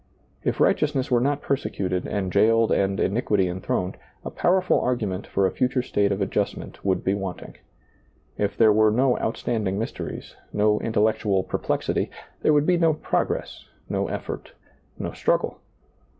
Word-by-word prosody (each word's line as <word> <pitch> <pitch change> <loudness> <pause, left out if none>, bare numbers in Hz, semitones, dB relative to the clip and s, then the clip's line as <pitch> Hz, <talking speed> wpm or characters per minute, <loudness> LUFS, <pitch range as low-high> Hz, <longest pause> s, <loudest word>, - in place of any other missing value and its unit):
If - - -1
righteousness 145 -4 +2
were 120 -1 +4
not 140 +2 0
persecuted 95 -9 -1
and 95 -3 -2
jailed 115 0 +4
and 95 0 +1
iniquity 105 -3 +1
enthroned, 90 0 -2 0.3
a - - -4
powerful 185 +1 +2
argument 105 -7 -2
for 100 - +1
a 95 - +1
future 125 +2 0
state 100 -5 +1
of 100 0 -1
adjustment - - -3
would 95 -2 0
be 95 - +1
wanting. 95 -2 -5 0.8
If 100 -1 -1
there 110 -2 +6
were 110 0 +5
no 125 +4 +2
outstanding 110 -4 -1
mysteries, 115 - -5 0.2
no 105 0 +2
intel 110 -2 +1
lectual 95 -3 -1
perplexity, - - -1 0.3
there - - +4
would 150 -1 +4
be 180 0 +3
no 165 -2 +3
progress, - - -2 0.2
no - - -1
effort, - - -6 0.4
no - - -4
struggle. - - 0
110 Hz, 150 wpm, -24 LUFS, 95-125 Hz, 0.8 s, there